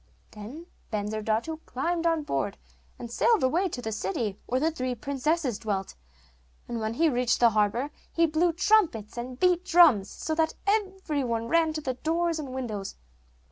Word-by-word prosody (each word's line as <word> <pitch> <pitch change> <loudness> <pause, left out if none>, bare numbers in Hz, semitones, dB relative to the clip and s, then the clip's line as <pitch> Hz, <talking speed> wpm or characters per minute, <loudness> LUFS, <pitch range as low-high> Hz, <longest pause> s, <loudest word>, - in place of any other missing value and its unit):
Then 235 +11 -9 0.3
Bensurdatu 215 +7 -1
climbed 335 +6 -1
on 325 -2 +1
board, 290 - -2 0.4
and 235 -1 -8
sailed 450 - +3
away 340 +9 +2
to 245 -6 -6
the 220 - -3
city 205 0 -2
where 255 - +1
the 320 +4 +1
three 255 -5 -3
princesses 275 -1 -1
dwelt; 200 -4 -3 0.7
and 235 - -3
when 220 +1 -2
he 330 +5 +3
reached 250 -4 +1
the 235 -1 +6
harbour 220 +7 +1 0.2
he 335 - +3
blew 325 +2 +2
trumpets 340 - +2
and 250 +1 -6
beat 360 -1 +3
drums, 310 - +5
so 315 - -4
that 320 0 +1
every 385 -8 0
one 230 -2 -2
ran 330 -1 +3
to 310 - -3
the 260 -3 -2
doors 330 +4 0
and 285 -3 -5
windows. 230 -7 -4
265 Hz, 170 wpm, -27 LUFS, 230-330 Hz, 0.7 s, the